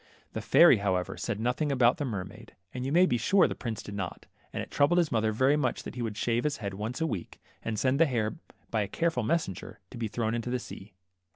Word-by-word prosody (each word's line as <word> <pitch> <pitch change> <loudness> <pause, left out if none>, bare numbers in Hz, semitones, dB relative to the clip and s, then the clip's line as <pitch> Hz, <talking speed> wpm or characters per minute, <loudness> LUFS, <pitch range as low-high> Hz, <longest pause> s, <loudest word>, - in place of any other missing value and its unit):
The - - -3
fairy - - +7
however, 95 -3 -1
said 110 -3 -3
nothing 125 +6 0
about 125 +1 +4
the 145 - -2
mer 100 -8 -3
maid, 95 - -14 0.2
and 125 - -4
you - - -2
may 175 +4 +6
be 120 -9 +1
sure 195 - +4
the - - -3
prince 115 -4 -5
did 105 - -8
not, 95 -3 -5 0.3
and - - -3
it - - -11
troubled 145 +5 +3
his 170 -3 +2
mother 110 -1 +1
very 130 +6 +3
much 140 -5 -1
that - - -7
he 125 - -5
would 110 -3 -3
shave 120 +2 0
his 150 -1 0
head 100 -5 -5
once 110 +9 -4
a - - +2
week, 110 - -5 0.2
and 110 -1 -3
send 130 +5 +1
the 165 - +6
hair 110 -5 0 0.4
by 110 - +1
a 100 - -1
careful 165 - 0
messenger, 110 - -2
to 120 - -8
be 115 - -1
thrown 110 +1 -2
into 120 +1 -2
the 125 - 0
sea. 100 -4 -10
120 Hz, 255 wpm, -29 LUFS, 105-140 Hz, 0.4 s, fairy